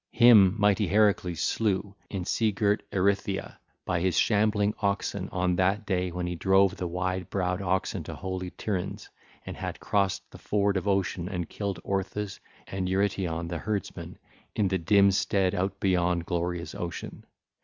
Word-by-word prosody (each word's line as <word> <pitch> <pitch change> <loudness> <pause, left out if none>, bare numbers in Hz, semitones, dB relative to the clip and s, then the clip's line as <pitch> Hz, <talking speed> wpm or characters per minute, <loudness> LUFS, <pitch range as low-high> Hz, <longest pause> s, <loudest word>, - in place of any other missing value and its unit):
Him 110 -6 +7
mighty 105 -1 +3
Heracles 100 -4 +2
slew 100 -2 0 0.2
in 95 -3 -4
sea 110 +3 +1
girt 100 +1 +1
Erythea 100 0 0 0.3
by 90 -1 0
his 90 -2 0
shambling 105 -1 +2
oxen 100 -1 -1
on 90 -1 0
that 95 +4 +1
day 90 -2 0
when 90 +1 -3
he 90 - -2
drove 95 +2 +3
the 90 - -3
wide 90 +1 -2
browed 90 -1 -1
oxen 95 0 -1
to - - -6
holy 95 -1 -4
Tiryns, 95 -1 -4 0.4
and - - -6
had - - -5
crossed 100 -2 0
the - - -12
ford 100 -1 +1
of 95 +1 -2
Ocean 95 -2 0
and 90 -4 -3
killed 100 -4 -4
Orthus 100 +1 -3 0.3
and 95 -1 -3
Eurytion 95 -4 0
the 85 -1 -4
herdsman 105 -4 -4 0.4
in 100 -3 +2
the 95 0 0
dim 100 +3 +5
stead 95 -1 +1
out 95 +2 -2
beyond 90 -2 +1
glorious 85 0 -2
Ocean. 85 -1 -6
95 Hz, 160 wpm, -27 LUFS, 90-100 Hz, 0.4 s, Him